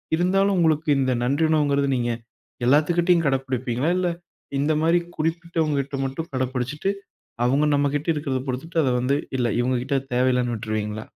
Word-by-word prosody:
இருந்தாலும் 195 +3 +2
உங்களுக்கு 160 -1 +2
இந்த 130 -1 +1
நன்றியுணர்வுங்கறது 140 0 +2
நீங்க 120 -1 -1 0.5
எல்லாத்துகிட்டயும் 165 +5 +3
கடைபிடிப்பீங்களா 130 0 -1
இல்ல 180 -1 +1 0.5
இந்த 150 +3 +2
மாரி 165 +2 +3 0.2
குறிப்பிட்டவங்ககிட்ட 160 -4 -1
மட்டும் 135 +5 -5
கடப்பிடிச்சிட்டு 130 +6 -2 0.6
அவங்க 140 +4 +3
நம்மகிட்ட 145 +2 0
இருக்கறத 140 -3 -2
பொறுத்துட்டு 135 +7 -4
அதை 130 - +2
வந்து 130 +3 +1 0.2
இல்ல 125 -2 +1
இவங்ககிட்ட 125 +2 -1 0.2
தேவ 125 +1 +2
இல்லைன்னு 125 -1 0
விட்ருவீங்களா? 110 -1 -3
140 Hz, 130 wpm, -23 LUFS, 125-160 Hz, 0.6 s, எல்லாத்துகிட்டயும்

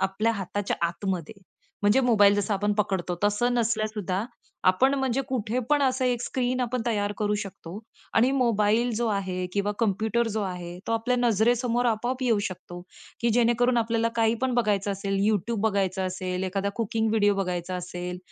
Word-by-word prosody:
आपल्या 200 +4 +1
हाताच्या 200 -1 -3
आतमध्ये 175 +2 -4 0.5
म्हणजे 205 +6 +4
मोबाईल 205 -5 +5
जसं 205 +1 0
आपण 205 +1 0
पकडतो 185 -3 0
तसं 225 +4 +2
नसल्या 230 -2 +1
सुद्धा 205 -2 -3 0.4
आपण 260 +10 +4
म्हणजे 265 -1 0
कुठे 240 -2 -1
पण 295 -1 +3
असं 260 -1 +1
एक 245 -2 +1
स्क्रीन 255 0 -1
आपण 250 -1 -1
तयार 205 -3 0
करू 210 -1 +1
शकतो 190 -1 -9 0.4
आणि 240 +3 +4
मोबाईल 230 0 +2
जो 235 +2 0
आहे 185 -3 -2
किंवा 205 +1 0
कॉम्प्युटर 220 +2 +1
जो 215 0 -2
आहे, 180 -2 -5
तो 230 - -1
आपल्या 230 +2 +1
नजरेसमोर 240 +1 +2
आपोआप 240 +3 -1
येऊ 235 -4 +2
शकतो, 175 -1 -9 0.4
की 235 - +2
जेणेकरून 240 +1 +3
आपल्याला 230 0 +1
काही 225 0 +3
पण 260 -1 +1
बघायचं 205 -4 +1
असेल, 195 0 -2
YouTube 220 +1 0
बघायचं 190 -2 0
असेल 185 0 -3
एखादा 195 +1 -1
कुकिंग 225 0 0
व्हिडिओ 205 -2 +3
बघायचा 180 -2 -2
असेल, 180 0 -5
215 Hz, 165 wpm, -26 LUFS, 195-235 Hz, 0.5 s, मोबाईल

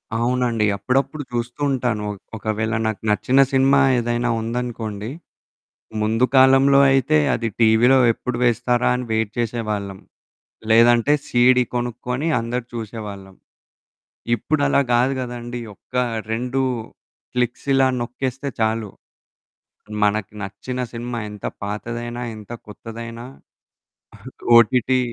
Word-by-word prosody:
అవునండి. 120 -2 +1
అప్పుడప్పుడు 135 +8 -1
జూస్తూ 120 +3 -4
ఉంటాను, 120 -5 -1
ఒక 100 - -9 0.2
ఒకవేళ 110 +1 -2
నాకు 110 - -3
నచ్చిన 130 +6 +2
సినిమా 135 +1 +4 0.2
ఏదైనా 120 +1 -1
ఉందనుకోండి 115 -2 -4 0.9
ముందు 110 +3 +2
కాలంలో 135 +1 +6
అయితే 130 -12 +3 0.2
అది 115 0 -2
టీవీ‌లో 115 +4 +5
ఎప్పుడు 125 +1 -4
వేస్తారా 120 +1 +2
అని 125 - -4
వెయిట్ 110 -1 0
చేసేవాళ్ళం. 105 -4 -3 0.7
లేదంటే 120 +4 +5
సీడీ 125 +1 +4
కొనుక్కొని 125 +4 -2
అందరూ 120 +1 -3
చూసేవాళ్ళం. 105 -4 -7 1.0
ఇప్పుడు 145 +6 -1
అలా 140 - +3
గాదు 125 +3 +3
గదండీ. 120 -1 -5
ఒక 125 - -31 0.4
2 120 +2 -2 0.8
క్లిక్సిలా 130 +2 +1
నొక్కేస్తే 130 +3 -4
చాలు. 110 -2 0 1.1
మనకి 105 -1 0
నచ్చిన 125 +6 -5
సినిమా 120 0 -4
ఎంత 105 -1 -7 0.2
పాతదైనా, 120 +4 -4
ఎంత 105 0 -13 0.2
కొత్తదనా 115 +2 -8 1.3
ఓటిటి 125 +2 +3
120 Hz, 105 wpm, -21 LUFS, 110-125 Hz, 1.3 s, కాలంలో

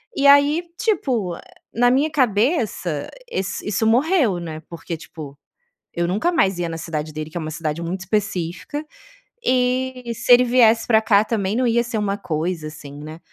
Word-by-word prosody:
E 280 0 +3
aí, 285 +4 +5
tipo, 245 - 0 0.4
na 245 +1 +4
minha 280 +5 +2
cabeça 220 - 0 0.2
esse 190 - -3
isso 210 +2 0
morreu, 250 - +3
né. 160 -2 -6
Porque, 170 0 -6
tipo, 150 -3 -10 0.6
eu 170 0 -1
nunca 210 - +1
mais 195 - +2
ia 170 -1 -1
na 165 0 -5
cidade 155 -2 -4
dele, 155 +1 -6
que 175 - -12
é - - -1
uma 155 - -4
cidade 155 0 -3
muito 180 +3 -4
específica, 195 - -3 0.6
e 255 -1 0
se 240 - -1
ele 250 +1 +7
viesse 235 -2 +4
pra 220 -2 +4
cá 210 -1 +4
também 210 -2 -1
não 255 +1 +1
ia 235 0 +2
ser 240 -1 -4
uma 205 -1 -1
coisa, 160 -1 -3
assim, 145 -2 -10
né. 155 +2 -9
205 Hz, 175 wpm, -21 LUFS, 170-250 Hz, 0.6 s, ele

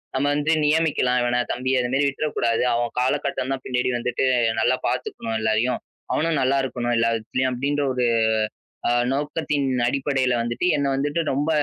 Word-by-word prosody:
நம்ம 130 +2 +1
வந்து 150 +2 +1
நியமிக்கலாம். 150 -5 +2
இவன, 120 0 +1
தம்பி, 130 +2 -2
அது 125 - 0
மாரி 135 +2 +2
விட்டுறக்கூடாது. 135 -5 0
அவன் 120 0 0
காலகட்டம் 135 0 -1
தான் 130 -1 -5
பின்னாடி 125 0 0
வந்துட்டு 125 +2 -1 0.3
நல்லா 120 +3 +3
பாத்துக்கணும் 115 0 -3
எல்லாரையும். 110 +3 +1 0.3
அவனும் 165 0 +1
நல்லா 130 +1 +2
இருக்கணும், 120 -2 -2
எல்லாவிதத்துலயும் 115 +3 0
அப்படின்ற 140 +3 -1
ஒரு 125 -1 0 0.8
ஆ, - - +2 0.2
நோக்கத்தின் 145 0 -1 0.2
அடிப்படையில 135 -1 0
வந்துட்டு 120 +8 -1
என்ன 140 -1 0
வந்துட்டு 145 +4 -1
ரொம்ப 145 +3 -1
130 Hz, 150 wpm, -23 LUFS, 120-145 Hz, 0.8 s, நல்லா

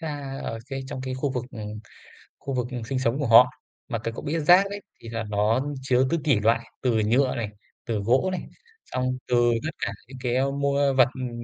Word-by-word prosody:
ra 145 -4 -5
ở 115 - -4
cái 135 0 -3
trong 135 - -5
cái 130 0 -4
khu 135 +1 -1
vực, 125 -2 -2
ừm, 105 -2 -7 0.6
khu 135 - -5
vực, 125 -2 -1
ừm, 125 -2 -4
sinh 130 +3 -2
sống 125 +2 0
của 140 - 0
họ. 115 +2 +8 0.4
Mà 120 - -1
cái 115 +1 -3
cậu - - -7
biết, 155 +2 -1
rác 180 +5 +6
đấy, 205 0 -6 0.2
thì 115 - -9
là 115 0 -3
nó 105 +3 +2 0.2
chứa 130 0 +2
ti 170 - +1
tỷ 135 -8 +3
loại 115 +2 +3 0.2
từ 125 -3 +2
nhựa 125 +4 +2
này, 115 -3 -2 0.4
từ 115 -4 -1
gỗ 125 - +2
này, 185 - -2 0.4
xong 130 0 -2
từ 125 - +1 0.3
tất 160 - -1
cả - - -1 0.2
những 130 +1 -10
cái, 120 -1 0
ơ, 135 +2 +2
mua 140 0 +1
vật, 130 -2 +6
ừm, 130 -2 -4
130 Hz, 230 wpm, -25 LUFS, 115-140 Hz, 0.6 s, họ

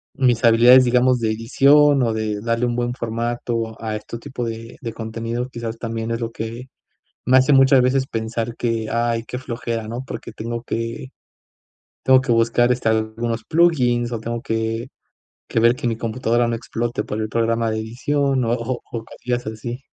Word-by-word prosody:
mis 125 -3 +2
habilidades, 120 +3 +7
digamos, 125 0 +3
de 110 - +1
edición 140 +5 +4
o 115 - +1
de 110 -1 -2
darle 115 +2 0
un 120 -1 -1
buen 120 0 -1
formato 115 -1 -3
a 110 -1 -3
este 105 +2 -7
tipo 125 0 -6
de 115 0 -6
de 115 -4 -5
contenido 115 +2 -4
quizás 115 -2 -5
también 115 0 -4
es 115 - -1
lo 115 -1 -3
que 115 +3 -6 0.6
me 130 - +4
hace 130 +3 +5
muchas 135 -1 +6
veces 130 +1 +1
pensar 115 +1 -3
que: 115 -2 -1
"Ay, 115 0 0
qué 125 - -4
flojera", 115 -3 -4
¿no?, 120 +3 -5
porque - - -7
tengo 115 +1 -5
que 115 +3 -4 0.9
tengo 130 0 +6
que 130 -2 0
buscar, 115 +1 +3
este, 125 -2 -1
algunos 110 +1 -1
plugins 125 -8 +2
o 115 - -2
tengo 115 +1 -4
que 115 +2 -2 0.6
que 115 - +1
ver 120 +2 +4
que 125 - -4
mi 115 - +1
computadora 115 +1 0
no 115 - -1
explote 115 -1 -3
para 110 +1 -3
el 110 - -2
programa 115 0 0
de 110 - -2
edición 135 +4 0
o 115 - 0
o 120 +1 -2
o 115 -1 -5
cosillas 125 +1 -4
así. 110 +3 -5
115 Hz, 185 wpm, -21 LUFS, 115-125 Hz, 0.9 s, habilidades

